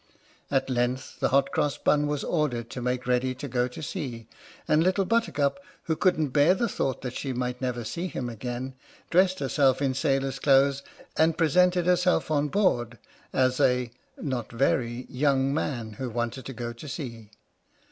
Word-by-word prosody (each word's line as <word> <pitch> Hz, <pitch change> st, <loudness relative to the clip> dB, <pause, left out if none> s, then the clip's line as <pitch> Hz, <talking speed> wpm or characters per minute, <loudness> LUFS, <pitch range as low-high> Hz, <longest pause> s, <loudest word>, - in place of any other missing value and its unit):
At 135 Hz, -1 st, +1 dB
length 125 Hz, 0 st, -2 dB
the -, -, +2 dB
Hot 140 Hz, +1 st, +3 dB
Cross 145 Hz, -, 0 dB
Bun 150 Hz, 0 st, +2 dB
was 145 Hz, -1 st, -2 dB
ordered 125 Hz, -8 st, -1 dB
to 125 Hz, -, -5 dB
make 125 Hz, 0 st, -1 dB
ready 125 Hz, +1 st, +1 dB
to 140 Hz, +3 st, -6 dB
go 125 Hz, -1 st, 0 dB
to 125 Hz, +5 st, -9 dB
sea, 125 Hz, -, -5 dB, 0.4 s
and 155 Hz, +1 st, +4 dB
Little 190 Hz, +2 st, +2 dB
Buttercup, 185 Hz, -10 st, +1 dB, 0.2 s
who 160 Hz, -, 0 dB
couldn't 160 Hz, -4 st, +2 dB
bear 145 Hz, +7 st, +4 dB
the 235 Hz, +4 st, 0 dB
thought 135 Hz, -, -2 dB
that 125 Hz, -1 st, -4 dB
she 135 Hz, 0 st, -3 dB
might 125 Hz, 0 st, -3 dB
never 125 Hz, -2 st, -2 dB
see 170 Hz, +11 st, -3 dB
him 130 Hz, -8 st, -4 dB
again, 120 Hz, +3 st, -5 dB, 0.4 s
dressed 185 Hz, +1 st, +4 dB
herself 135 Hz, -2 st, +2 dB
in 135 Hz, -2 st, +1 dB
sailor's 135 Hz, -1 st, 0 dB
clothes, 140 Hz, 0 st, +4 dB, 0.4 s
and 160 Hz, 0 st, +3 dB
presented 180 Hz, +2 st, +3 dB
herself 180 Hz, -2 st, +2 dB
on 150 Hz, -1 st, +2 dB
board, 125 Hz, -, +1 dB, 0.3 s
as 130 Hz, -1 st, +2 dB
a 125 Hz, -2 st, +2 dB, 0.3 s
(not 130 Hz, -6 st, -3 dB
very) 120 Hz, 0 st, 0 dB
young 135 Hz, 0 st, +1 dB
man 120 Hz, -7 st, -2 dB
who 125 Hz, +4 st, -4 dB
wanted 120 Hz, +2 st, -3 dB
to 135 Hz, -, -6 dB
go 120 Hz, 0 st, -5 dB
to 120 Hz, +6 st, -10 dB
sea. 115 Hz, -8 st, -6 dB
135 Hz, 175 wpm, -27 LUFS, 125-150 Hz, 0.4 s, and